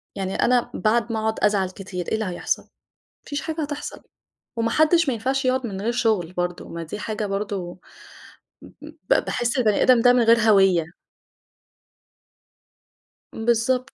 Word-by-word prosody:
يعني 190 -1 -3
أنا 245 -1 +2
بعد 230 +2 0
ما 220 - -1
أقعُد 220 0 -1
أزعل 205 -3 +2
كتير 185 -2 -7
إيه - - -3
اللي 220 0 -1
هيحصل؟ 180 -2 -3 0.6
فيش 285 -1 -4
حاجة 320 0 -4
هتحصل، 290 0 -6 0.5
وما 230 0 0
حدِّش 315 +5 +3
ما 265 - +1
ينفعش 265 +4 -1
يقعُد 255 0 +1
من 195 -2 -6
غير 225 +3 0
شُغل 215 -8 0
برضه، 175 0 -3
ما 170 0 -6
دي 165 +6 -7
حاجة 215 0 -3
برضه 195 -3 -4 1.0
ب - - -1
باحس 240 0 -1
البَني 215 -5 +2
آدم 250 -2 +5
ده 245 +1 +6
من 245 -1 +3
غير 230 +1 +5
هويّة. 195 -7 +3 2.4
بالضبط. 240 +3 0
220 Hz, 150 wpm, -23 LUFS, 195-250 Hz, 2.4 s, ده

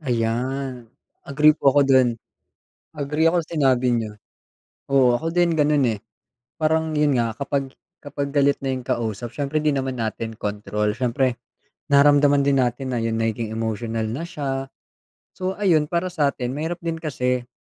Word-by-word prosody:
Ayan, 125 0 -2 0.4
agree 150 +2 +5
po 150 -2 +2
ako 140 +1 +4
dun. 130 -2 +5 0.9
Agree 150 +2 0
ako 170 +1 +3
sa 165 0 -6
sinabi 130 -3 +3
niyo. 115 -3 -1 0.7
Oo, 130 -3 +3
ako 160 - -4
din 175 -1 +3
ganun, 150 -2 +2
eh. 115 -4 0 0.6
Parang 160 0 +1
yun 150 -2 +2
nga 115 -2 +1
kapag, 140 -1 -2 0.3
kapag 145 0 -4
galit 140 0 +3
na 135 -1 -2
yung 130 - -6
kausap, 115 -1 -3
siyempre 150 +1 -2
din 145 -3 +2
naman 130 -1 -3
natin 115 -1 -4
control. 105 0 -2
Siyempre, 125 +2 0 0.5
nararamdaman 145 0 +5
din 140 0 +2
natin 130 +1 0
na 125 - -1
yung 115 -1 -1
nagiging 115 0 -2
emotional 110 0 -2
na 140 +9 -4
siya. 135 -5 -3 0.7
So, 185 +1 -4
ayun, 165 -7 +2
para 175 +2 -1
sa 150 -5 +2
atin, 125 -3 -4
mahirap 160 +5 -3
din 165 -1 -3
kasi 125 -5 -2
135 Hz, 160 wpm, -22 LUFS, 120-150 Hz, 0.9 s, agree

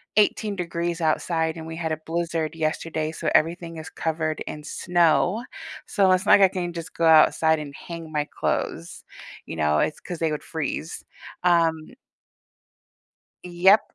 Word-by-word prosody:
18 210 0 +2
degrees 170 -1 -3
outside, 160 +1 0
and 160 - -7
we 160 - -7
had 160 -1 -3
a 155 - -1
blizzard 165 -1 -2
yesterday, 155 0 -2
so 160 - -2
everything 165 +1 +1
is 160 - -8
covered 160 -1 -2
in 150 0 -6
snow, 175 +7 +1 0.4
so 195 -4 +3
it's 185 0 +2
not - - +6
like - - +2
I 190 - +5
can 175 -2 -2
just 165 -1 -7
go 165 - +1
outside 160 0 +5
and 145 -2 -7
hang 165 0 -8
my 150 -1 -1
clothes, 85 - -3 0.4
you 80 - -7
know? 75 -1 +2
It's 155 - 0
'cause 175 -2 -7
they 160 -2 0
would 150 - -4
freeze, 160 +1 -4 0.4
um 170 -2 +4 1.7
Yep. 180 +4 +5
165 Hz, 160 wpm, -24 LUFS, 155-175 Hz, 1.7 s, not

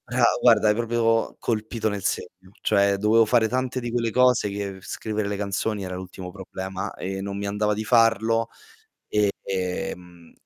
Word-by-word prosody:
Bra - - 0 0.2
guarda, 110 - +5
hai 105 - +5
proprio 115 0 +1
colpito 110 0 -2
nel 100 -3 -3
segno. 95 +1 -4
Cioè 100 0 +2
dovevo 110 +3 +4
fare 115 0 +3
tante 130 +2 -1
di 120 -1 -4
quelle 115 -1 0
cose, 125 -3 +3
che 100 -1 -5
scrivere 110 +2 -3
le 100 0 -2
canzoni 100 +1 -2
era 90 -1 -5
l'ultimo 90 0 -8
problema 95 0 -6
e 95 +1 -4
non 100 0 -4
mi 100 - -3
andava 105 +1 0
di 110 - -3
farlo. 115 0 +3 1.0
Ehm, 90 -2 -4
105 Hz, 160 wpm, -24 LUFS, 95-115 Hz, 1.0 s, guarda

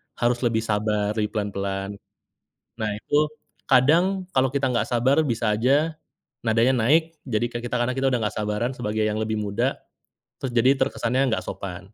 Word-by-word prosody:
harus 120 0 +1
lebih 115 -2 0
sabar, 105 -1 0
lebih 105 -1 0
pelan-pelan. 100 -1 -3 0.8
Nah 110 -1 0
itu 145 +7 +1 0.5
kadang 170 +9 +4
kalau 130 0 +3
kita 140 -1 +1
enggak 120 - 0
sabar 125 +3 +2
bisa 115 -4 0
saja 145 +8 +2 0.5
nadanya 115 +3 +3
naik, 160 +8 +2
jadi 120 -2 -1
kan 120 0 -5
kita 120 - -3
karena 125 +1 0
kita 135 0 +1
udah 125 - +1
enggak 105 -2 -2
sabaran 105 +4 -1
sebagai 110 -3 -2
yang 105 - -1
lebih 110 0 -2
muda, 105 +6 -1 0.6
terus 135 - -2
jadi 130 +4 +5
terkesannya 130 -1 0
enggak 110 - -1
sopan. 95 +1 -7
120 Hz, 165 wpm, -24 LUFS, 105-130 Hz, 0.8 s, jadi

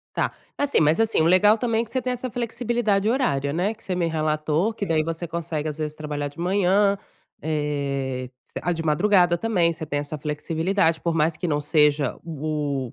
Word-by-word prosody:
Tá. - - +1 0.3
Assim 285 -8 +2
mas, 155 +5 +3
assim, 225 -7 +3
o - - +2
legal 185 +5 +5
também 230 -1 0
é - - -4
que 225 - -19
você 260 - -1
tem 255 - -1
essa 250 0 -4
flexibilidade 230 -3 0
horária, 145 - +1
né, 190 +7 0
que 220 - -24
você 185 - -3
me 175 -1 0
relatou, 155 +4 0
que 205 - -3
daí 160 -4 +1
você 165 +2 -4
consegue, 160 -2 -3
às 150 0 -5
vezes, 150 -1 -3
trabalhar 150 -2 -4
de 145 - -17
manhã, 195 +2 +2 0.4
eh, 140 -4 -2 0.2
você - - -8
ah, 175 - 0
de 165 -1 -3
madrugada 175 +2 +3
também, 180 -5 +2
você 160 -1 -7
tem 145 -1 -1
essa 145 +1 -6
flexibilidade, 160 +3 0
por 170 -1 -1
mais 160 0 +1
que 180 - -3
não 145 -1 +1
seja 150 -2 +2
o 150 -5 -3
165 Hz, 205 wpm, -24 LUFS, 150-200 Hz, 0.4 s, legal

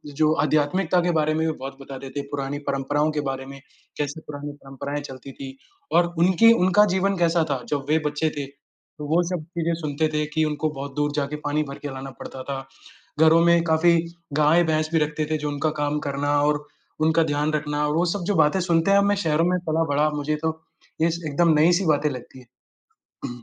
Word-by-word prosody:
जो 155 +1 +3
आध्यात्मिकता 165 +4 +2
के 175 0 +1
बारे 155 -1 +1
में 160 +1 0
भी 160 - 0
बहुत 135 +1 -7
बताते 135 0 -8
थे, 140 - -4
पुरानी 140 0 -3
परंपराओं 145 +3 0
के 150 -1 -2
बारे 135 0 -4
में 135 0 -10 0.4
कैसे 145 +2 -3
पुरानी 145 0 -6
परंपराएँ 140 +2 -5
चलती 135 -1 -9
थी 135 0 -9 0.4
और 175 0 +3
उनकी 185 +6 +6
उनका 205 0 +4
जीवन 195 +1 +1
कैसा 170 -1 +2
था 130 -3 -2
जब 140 -2 -2
वे 155 - +4
बच्चे 150 +2 0
थे, 140 - -2
तो 145 +1 -15
वो 165 +3 +3
सब 180 -4 -3
चीज़ें 170 0 0
सुनते 150 +1 0
थे 150 0 0
कि 160 -1 +2
उनको 155 +1 -1
बहुत 135 0 -7
दूर 145 0 0
जाके 145 0 -1
पानी 150 +1 +1
भर 140 -1 -8
के - - 0
लाना 135 +1 -7
पड़ता 130 -1 -8
था। 135 0 -4 0.7
घरों 160 +1 +6
में 170 0 +5
काफ़ी 170 +1 +4 0.5
गाय-भैंस 155 0 +3
भी 165 - +3
रखते 150 0 -1
थे 155 - +2
जो 150 0 -3
उनका 145 +2 -1
काम 145 0 0
करना 145 +1 -1
और 150 0 +1 0.4
उनका 160 +1 +3
ध्यान 150 0 0
रखना, 150 0 -1
वो 160 +4 +1
सब 200 -4 -3
जो 205 - +1
बातें 150 +4 +3
सुनते 170 0 +2
हैं 200 - +6
अब 200 - +3
मैं 205 0 +2
शहरों 155 +1 +2
में 180 - +1
पला-बड़ा 155 -2 +2
मुझे 150 +1 -1
तो 160 0 -1 0.4
ये 165 +1 +3
स 170 +1 -4
एकदम 160 +3 +3
नई-सी 175 +4 +4
बातें 150 -1 +2
लगती 130 0 -9 0.6
हैं। 120 -1 -9
150 Hz, 210 wpm, -24 LUFS, 145-165 Hz, 0.7 s, उनकी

